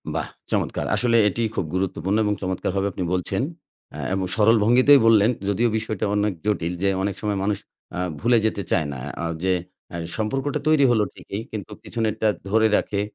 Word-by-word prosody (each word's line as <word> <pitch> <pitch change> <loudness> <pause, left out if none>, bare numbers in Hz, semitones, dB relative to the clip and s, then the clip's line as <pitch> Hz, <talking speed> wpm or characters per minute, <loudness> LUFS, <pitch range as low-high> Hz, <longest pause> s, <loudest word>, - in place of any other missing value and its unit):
বাহ! - - -1 0.2
চমৎকার। - - -1
আসলে 120 -1 +3
এটিই 110 +3 -1
খুব 95 - -1
গুরুত্বপূর্ণ 95 +1 -1
এবং 105 - +1
চমৎকারভাবে 95 +1 -1
আপনি 95 - -4
বলছেন। 90 +5 -1 0.5
অ্যা - - -7
এবং 95 -1 0
সরল 115 +1 +5
ভঙ্গিতেই 130 +5 +6
বললেন, 110 -1 +5 0.2
যদিও 115 +4 +2
বিষয়টা 110 -2 -2
অনেক 105 0 +1
জটিল 90 -5 0
যে, 100 - +4
অনেক 100 -1 -1
সময় 105 -2 -1
মানুষ 100 0 0 0.3
অ্যা - - -5 0.2
ভুলে 120 +1 +3
যেতে 110 -2 0
চায় 80 - +2
না, 65 - -7 0.2
অ্যা 85 - -3 0.2
যে 95 0 +3 0.4
এহ 85 - -4 0.2
সম্পর্কটা 135 +7 -1
তৈরি 155 -3 +5
হলো 110 -3 +3
ঠিকই 100 - -6
কিন্তু 105 -4 -6
পিছনেরটা 110 -1 -1 0.2
ধরে 110 +2 +4
রাখে 100 -1 -1
105 Hz, 180 wpm, -23 LUFS, 95-115 Hz, 0.5 s, ভঙ্গিতেই